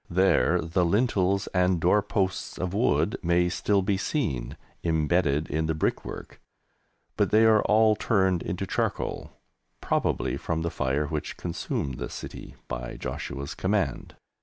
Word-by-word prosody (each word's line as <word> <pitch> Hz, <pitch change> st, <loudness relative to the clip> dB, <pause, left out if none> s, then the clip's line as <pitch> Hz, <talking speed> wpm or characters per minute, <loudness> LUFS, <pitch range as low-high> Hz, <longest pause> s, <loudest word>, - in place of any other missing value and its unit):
There 90 Hz, -1 st, +3 dB
the 85 Hz, +3 st, 0 dB
lintels 100 Hz, 0 st, +2 dB
and 90 Hz, -1 st, +2 dB
door 90 Hz, +5 st, +4 dB
posts 95 Hz, -1 st, -2 dB
of 90 Hz, +1 st, -3 dB
wood 100 Hz, -, +1 dB
may 85 Hz, +1 st, +2 dB
still 100 Hz, +2 st, +1 dB
be 95 Hz, +1 st, +1 dB
seen 70 Hz, -, -2 dB, 0.3 s
embedded 80 Hz, -2 st, +1 dB
in 80 Hz, +2 st, -1 dB
the 80 Hz, -, 0 dB
brickwork, 80 Hz, -, -3 dB, 0.8 s
but -, -, +2 dB
they 110 Hz, +1 st, +5 dB
are 110 Hz, -1 st, +5 dB
all 110 Hz, 0 st, +4 dB
turned 95 Hz, -5 st, +1 dB
into -, -, -3 dB
charcoal, -, -, -2 dB, 0.5 s
probably -, -, 0 dB
from 80 Hz, -1 st, -2 dB
the 85 Hz, -, -2 dB
fire 70 Hz, +3 st, 0 dB
which 75 Hz, 0 st, -4 dB
consumed 80 Hz, -6 st, -3 dB
the -, -, -4 dB
city -, -, -8 dB
by -, -, -5 dB
Joshua's 70 Hz, 0 st, -5 dB
command. 95 Hz, -, -1 dB
90 Hz, 140 wpm, -27 LUFS, 80-100 Hz, 0.8 s, they